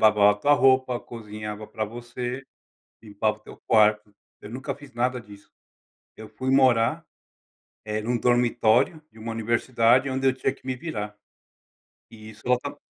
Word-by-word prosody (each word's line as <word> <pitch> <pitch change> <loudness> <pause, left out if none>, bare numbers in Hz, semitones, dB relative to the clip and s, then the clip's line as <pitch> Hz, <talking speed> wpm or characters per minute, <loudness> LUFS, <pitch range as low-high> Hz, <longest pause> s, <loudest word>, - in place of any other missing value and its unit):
lavava 105 -1 +6
a - - -4
tua 145 +8 +2
roupa, 130 -2 +3
cozinhava 105 -2 -8
pra 110 - -3
você, 120 +3 -6 0.6
limpava 105 0 -1
o - - -27
teu - - -14
quarto. 105 -1 +3 0.3
Eu 105 - -10
nunca 130 +4 -5
fiz 145 -1 -15
nada 125 +1 0
disso. 100 -1 -16 0.7
Eu 110 0 -10
fui 130 0 -3
morar, 130 +3 +3 0.8
eh, 105 0 -3
num 120 +2 -1
dormitório 120 +4 +2
de 110 - -17
uma 115 +1 -5
universidade, 115 +3 +2
onde 135 0 0
eu 130 - +4
tinha 130 0 -1
que 135 - -23
me 130 - -2
virar. 105 -8 -5 1.0
E 110 -1 -12
isso 110 +1 -17
ela 125 - +4
está 125 - -7
120 Hz, 165 wpm, -25 LUFS, 110-130 Hz, 1.0 s, lavava